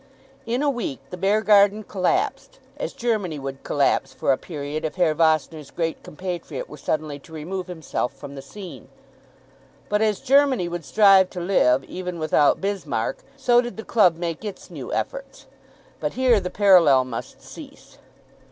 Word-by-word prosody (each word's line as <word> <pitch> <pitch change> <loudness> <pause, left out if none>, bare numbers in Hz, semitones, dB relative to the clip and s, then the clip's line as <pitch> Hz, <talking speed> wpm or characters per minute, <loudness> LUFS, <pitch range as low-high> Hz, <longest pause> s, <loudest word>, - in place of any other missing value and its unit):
In 245 +4 0
a 290 - +3
week 230 - -4
the - - -4
Beargarden 205 +2 +3
collapsed, 200 - -1 0.2
as - - -4
Germany 220 - -2
would 135 -1 -6
collapse 145 -1 +1
for - - 0
a - - +4
period 150 0 -6
if 155 - -3
Herr 175 -4 +2
Vossner's 155 -2 +1
great 165 -2 -3
compatriot 185 - -6
were - - -11
suddenly 155 -2 -3
to 150 - -18
remove 175 +4 -5
himself 160 -7 -3
from 140 - -11
the 135 - -8
scene; 185 +7 -10 1.0
but 210 +1 +1
as 215 -2 +1
Germany 270 -7 +3
would 175 -2 -5
strive 195 -3 +5
to 180 - -7
live 135 -8 +2
even 180 +3 -6
without 155 -2 +3
Bismarck, 180 - -2 0.2
so 245 -3 +4
did 240 -1 -7
the 220 - -6
club 190 -7 +4
make 170 0 -4
its 205 -3 -8
new - - -7
efforts. - - -4 0.5
But - - -2
here 250 -4 +3
the 180 - -4
parallel 175 -10 +5
must 120 -3 -7
cease. - - -13
180 Hz, 160 wpm, -23 LUFS, 155-210 Hz, 1.0 s, strive